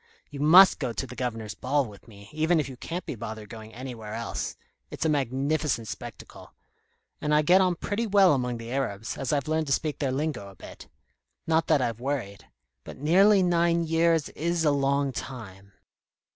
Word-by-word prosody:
You 140 - -8
must 175 +6 +7
go 125 -5 -2
to 135 - -3
the 125 -1 -10
Governor's 115 -5 -4
ball 140 +2 0
with 105 -1 -13
me, 100 -2 -14
even 160 +2 +2
if 150 - -1
you 130 - -8
can't 170 +8 -6
be - - -4
bothered 110 -2 -7
going 110 0 -10
anywhere 115 -4 -7
else. 115 0 -4 0.3
It's - - -4
a - - +3
magnificent 140 -2 0
spectacle. - - -10 0.7
And 150 0 +1
I 150 - +4
get 180 +5 +5
on 180 -2 +2
pretty 215 +6 -2
well 195 -4 +5
among 125 -3 -1
the 115 +1 -8
Arabs, 110 -6 -3
as 135 -2 -3
I've 145 -2 0
learned 155 0 0
to 135 - +2
speak 155 0 -2
their 135 -3 0
lingo 145 -6 -2
a 95 - -15
bit. - - -12 0.6
Not 160 0 +1
that 150 -5 +3
I've 115 -2 -2
worried. 120 -7 -4 0.4
But - - -10
nearly 190 +7 +5
nine 170 -1 +2
years 165 -1 +2
is 170 +1 -1
a 150 - +4
long 140 0 +1
time." 100 -7 -8
140 Hz, 190 wpm, -27 LUFS, 115-160 Hz, 0.7 s, must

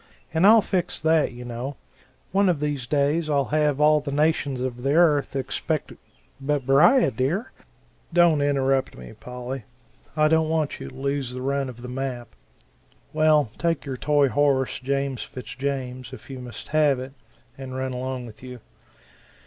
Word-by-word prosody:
And 165 +5 +4
I'll 220 0 +7
fix 180 -2 -1
that, 160 -1 +2
you 125 0 -9
know. 125 +3 -5 0.5
One 195 0 +3
of 170 -5 +1
these 145 -4 -2
days 150 +3 +1
I'll 140 -3 +1
have 150 -2 +2
all 150 0 +5
the 145 -1 -6
nations 145 -2 +1
of 125 -1 -4
the 140 +3 +1
earth 155 -5 +3
expecto 135 - -2 0.3
" - - -30
"But 145 -3 +1
Beriah, 155 - +5
dear 140 - -1 0.3
" - - -36
"Don't 170 -3 +4
interrupt 135 -2 +1
me; 60 -1 -10
Polly 125 0 -7 0.5
I 155 0 +5
don't 160 0 +2
want 160 -2 -1
you - - -7
to - - -15
lose 135 -1 -2
the 125 - -5
run 140 0 -1
of 120 -1 -11
the - - -6
map 125 -1 -4 0.8
well, 155 -5 +3
take 165 -3 0
your 135 -2 -4
toy 145 +1 +2
horse, 135 +1 +1
James 135 -1 -2
Fitz 125 - -8
James, 130 -2 -4
if - - -11
you 130 - -7
must 120 -4 -9
have 150 -4 +3
it 130 +1 -7 0.4
and 130 -1 -8
run 130 0 -3
along 130 0 -4
with 110 -3 -13
you. 125 -1 -9
140 Hz, 175 wpm, -24 LUFS, 130-150 Hz, 0.8 s, I'll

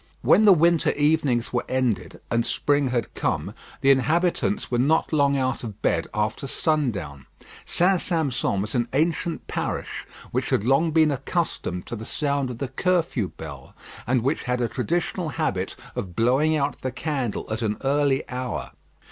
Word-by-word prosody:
When 215 - +5
the 205 - +9
winter 170 -1 +4
evenings 145 -6 +1
were 120 - +1
ended 130 -5 -1
and 115 0 +2
spring 145 +2 +1
had 125 -3 -2
come, - - -2 0.3
the 135 - +6
inhabitants 170 +8 +1
were 120 - +1
not 155 +5 +2
long 140 -2 +3
out 130 -1 -1
of 110 -3 -7
bed - - +1
after 105 +5 -2
sundown. 100 - -1 0.4
St. 180 +1 +2
Sampson 140 - 0
was 105 - -4
an 120 -2 +1
ancient 165 +3 0
parish - - -4 0.2
which - - -1
had 100 - +1
long 135 +6 +3
been 155 -1 +4
accustomed 135 - -2
to - - -5
the 110 0 -8
sound 140 -3 -1
of 125 - -6
the 135 +1 -3
curfew 165 - 0
bell, 70 -5 -9 0.3
and 125 -1 +2
which 140 +5 0
had 125 -1 -1
a 120 - +1
traditional 170 +6 -2
habit 95 - -2 0.2
of 95 -8 -5
blowing 135 - +3
out 145 0 -1
the 130 - -2
candle 135 -5 -2
at 110 - -3
an 105 -2 -1
early 140 0 +2
hour. 125 0 -4
135 Hz, 165 wpm, -24 LUFS, 120-155 Hz, 0.4 s, the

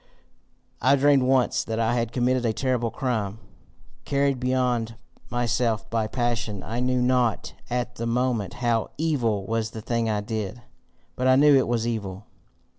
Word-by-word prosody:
"I 135 +3 +5
dreamed 140 0 +4
once 130 -1 +2
that 115 0 -3
I 115 +1 +2
had 115 -1 -1
committed 125 +1 +1
a 115 -2 +1
terrible 125 -2 0
crime. 110 -5 -2 0.7
Carried 140 -2 +1
beyond 125 -3 0 0.3
myself 120 -2 0
by 115 -1 0
passion, 115 -4 -2
I 115 +2 -4
knew 125 0 +1
not 125 -2 +1 0.2
at 125 0 -2
the 115 - -3
moment 120 -3 0
HOW 115 -2 +1
evil 120 -11 0
was 115 +1 -1
the 110 -1 -8
thing 115 -1 0
I 105 -1 0
did. 110 +2 -4 0.5
But 130 - 0
I 130 - +6
knew 145 +1 +6
it 130 - +3
was 115 -1 0
evil. 105 -4 -4
120 Hz, 160 wpm, -25 LUFS, 115-125 Hz, 0.7 s, I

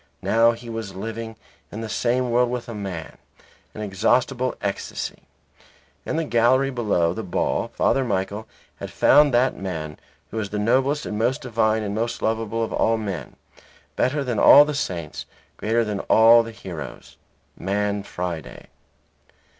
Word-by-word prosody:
Now 115 +1 +4
he 120 +1 -11
was 115 -4 -6
living 115 +3 -6 0.4
in 110 - -6
the 115 - -4
same 120 +4 0
world 125 +1 +3
with 125 -1 -4
a 115 - -6
man; 95 -6 -6 0.6
an 110 - -6
inexhaustible 120 +6 +1
ecstasy. 100 -1 -4 0.9
In - - -1
the 165 - 0
gallery 130 +1 +3
below 100 -9 +1
the 110 - -4
ball 95 -5 -1
Father 135 - +1
Michael 100 -1 -2 0.3
had - - -7
found 145 -1 +5
that 125 +2 +2
man 80 -5 -5 0.3
who 110 - -3
is 100 -2 -3
the 105 - -4
noblest 130 +7 +1
and 105 - -4
most 120 +3 0
divine 110 -2 +1
and 100 -1 -3
most 115 +2 -2
lovable 115 0 -1
of 110 - -4
all 115 0 +2
men, 100 -6 -5 0.6
better 140 +3 +1
than 120 -5 -2
all 145 +1 +9
the 150 - -3
saints, 90 - -4 0.3
greater 115 +2 +1
than 105 -2 -3
all 115 +3 +6
the 115 - -6
heroes 85 - -9 0.4
man 100 +1 -1
Friday. 90 -4 -6
110 Hz, 155 wpm, -23 LUFS, 100-120 Hz, 0.9 s, all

